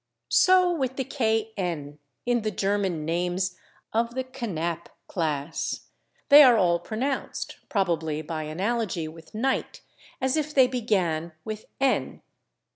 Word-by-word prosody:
So 365 -1 +5
with 265 -5 -1
the 265 - -2
/kn/ 215 - -2 0.3
in 240 -1 +2
the 215 - -1
German 195 -5 -1
names 180 +2 -1 0.4
of 230 +2 0
the 260 - -1
/Knapp/ 175 -10 -4 0.2
class; 155 -3 -2 0.5
they 290 +1 +11
are 250 -5 +8
all 170 -3 +3
pronounced, 250 +10 -3
probably 165 -6 0
by 155 0 -4
analogy 185 +1 -1
with 165 +4 -13
/Knight/, 260 +5 -1 0.4
as 260 0 +1
if 300 -1 -2
they 260 -2 +7
began 185 -10 0
with 215 0 -5
/n 270 -1 +1
205 Hz, 125 wpm, -26 LUFS, 170-250 Hz, 0.5 s, they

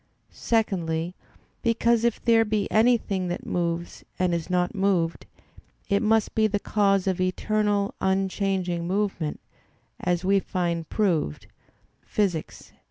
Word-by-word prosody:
Secondly, 175 -7 -1 0.5
because 230 -1 +2
if 235 -2 +1
there 230 -1 +5
be 210 -1 -1
anything 215 -5 +2
that 175 - -4
moves 170 -1 -2
and 180 -1 +1
is 170 0 -2
not 180 -1 +1
moved, 190 -5 0 0.6
it 200 -1 +2
must 220 -1 +2
be 220 -1 +3
the 205 -1 0
cause 195 -2 +2
of 190 -1 0
eternal, 205 +2 0
unchanging 190 -2 0
movement, 190 -5 -1 0.6
as 180 0 -1
we 195 +1 +4
find 170 -3 -2
proved 170 - 0 0.6
Phys. 185 -7 -2
195 Hz, 120 wpm, -25 LUFS, 175-210 Hz, 0.6 s, there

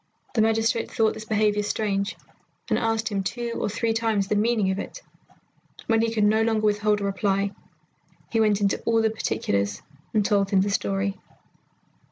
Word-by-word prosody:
The 225 - +2
magistrate 225 +1 +1
thought 220 -1 +1
this 215 - -8
behaviour 210 -1 +2
strange, 205 -1 -1 0.5
and - - +3
asked 225 -1 0
him 200 -2 -1
two 235 +4 -3
or - - 0
three 225 +2 0
times 225 -3 0
the 210 - +2
meaning 215 -2 +2
of 190 - -2
it. - - -7 0.8
When 225 -1 +2
he 230 0 +1
could 220 -2 +1
no 215 +2 +4
longer 220 -1 +1
withhold 210 0 +2
a - - -2
reply, 195 0 0 0.8
he 225 - +1
went 210 -2 +3
into 200 -1 +1
all 225 -1 +3
the 220 - +2
particulars 100 - -1 0.3
and 210 -2 +1
told 200 -1 +2
him 195 -1 +3
the 200 +1 0
story. 195 0 -1
210 Hz, 180 wpm, -25 LUFS, 200-225 Hz, 0.8 s, no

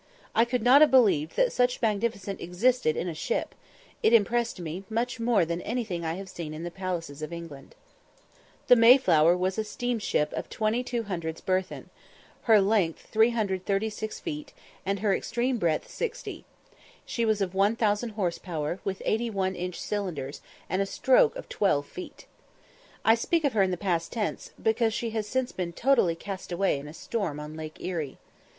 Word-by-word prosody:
I 230 - +4
could 240 -1 -1
not 260 +4 +7
have 305 - +8
believed 200 - +4
that - - +2
such 245 0 +2
magnificence 210 -3 -1
existed 190 0 +1
in 180 - -2
a 170 - -3
ship; 475 - -2 0.5
it 230 - +4
impressed 235 0 +2
me 170 +2 -5
much 240 +3 -2
more 230 -6 +3
than 170 +2 -3
anything 215 -7 -3
I 160 0 -2
have 195 +1 -7
seen 165 -4 -6
in 160 - -6
the 175 - -4
palaces 170 -5 -4
of 155 - -5
England. 165 -5 -9 0.9
The 250 - +7
Mayflower 185 - +6
was 185 +3 -1
a - - +1
steam 240 +2 -2
ship 150 -7 0
of - - -4
2200 215 -7 -2
tons - - -14
burthen, 185 0 -2 0.6
her 220 -2 +8
length 195 -5 +1
336 215 -1 0
feet, 300 -3 -6 0.3
and 195 0 -1
her 205 -3 +3
extreme 245 0 -1
breadth 165 -4 0
60. 480 - -5 0.6
She 235 - -2
was 220 -2 +2
of 190 -2 -1
1000 210 +3 +2
horse 195 -6 -2
power, 165 -1 -3
with 195 -1 -4
81 215 -4 0
inch 180 0 -4
cylinders, 170 -10 -4 0.3
and 185 +3 0
a 195 - 0
stroke - - +3
of - - -7
12 145 -8 +1
feet. 180 - -10 0.8
I 225 - +7
speak 320 +8 +1
of 285 - +1
her 210 - +3
in 190 - +3
the 180 - -2
past 170 -3 -1
tense, 215 -3 -3
because 225 0 +1
she 230 -1 -2
has 220 -1 -2
since 260 +2 -1
been 175 -2 -4
totally 235 -8 +3
cast 190 +1 -7
away 175 -4 +1
in 140 - -9
a 150 - -9
storm 180 -10 -3
on 150 +1 -7
Lake 155 -1 -7
Erie. 160 -7 -4
200 Hz, 175 wpm, -27 LUFS, 175-230 Hz, 0.9 s, have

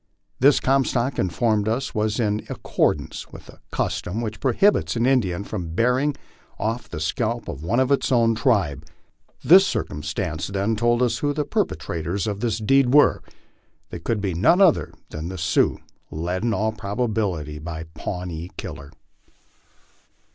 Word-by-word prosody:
This, 140 +2 +5
Comstock 130 -1 +1
informed 105 +3 +1
us, 120 +4 -1
was 110 +2 0
in 105 -2 0
accordance 75 +1 -1
with - - -12
a - - -14
custom 95 +6 -2
which 110 -2 -4
prohibits 145 - +2
an 115 0 +1
Indian 100 -9 +1
from 90 -6 -5
bearing 125 +6 +2 0.4
off 115 +4 -3
the 75 - -6
scalp 110 +9 -2
of 65 - -6
one 105 +10 0
of 130 0 +2
his 140 -1 +1
own 115 -2 +4
tribe. 105 - +1 0.6
This 190 +4 +7
circumstance, 75 - -3
then, 100 +3 -1
told 120 +2 +2
us 120 - 0
who 145 0 0
the 150 0 -1
perpetrators 85 - -2
of 105 -2 -3
this 110 -1 -1
deed 125 +3 +3
were. 145 - +5 0.7
They 85 - -6
could 105 +5 -2
be 95 -3 -1
none 100 - +4
other 190 -5 +4 0.2
than 80 +2 -5
the 95 - -6
Sioux, 85 +1 +2 0.3
led 90 +4 -3
in 120 - +1
all 110 +1 0
probability 100 - -2
by 80 0 -6
Pawnee 90 -2 -5
Killer. 70 0 -7
110 Hz, 155 wpm, -23 LUFS, 90-125 Hz, 0.7 s, This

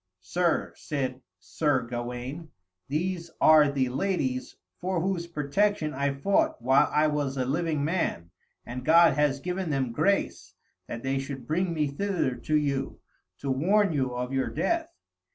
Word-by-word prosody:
"Sir," 175 - 0
said 130 -3 -3 0.2
Sir 125 - 0
Gawaine, 125 +6 -5 0.4
"these 170 +4 -2
are 150 -2 +6
the 130 -2 0
ladies 130 -3 -1 0.2
for 185 0 -1
whose 175 -1 -1
protection 155 +2 0
I 140 +1 0
fought 195 +8 +1
while 130 +3 +4
I 150 - +3
was 145 -3 -1
a 130 - 0
living 155 +1 0
man, 150 - -1 0.3
and 125 +1 -6
God 165 +4 +6
has 145 -1 +1
given 180 +3 -3
them 135 -4 0
grace 195 +12 0 0.3
that 115 - -6
they 135 0 0
should 135 -2 -6
bring 175 +6 0
me 155 -2 0
thither 165 -1 -1
to 125 +6 -2
you, 140 -2 -1 0.4
to 140 - -3
warn 190 +7 +2
you 130 -4 -1
of 125 +2 -3
your 135 -1 +1
death. 340 -1 -1
145 Hz, 150 wpm, -27 LUFS, 130-170 Hz, 0.4 s, are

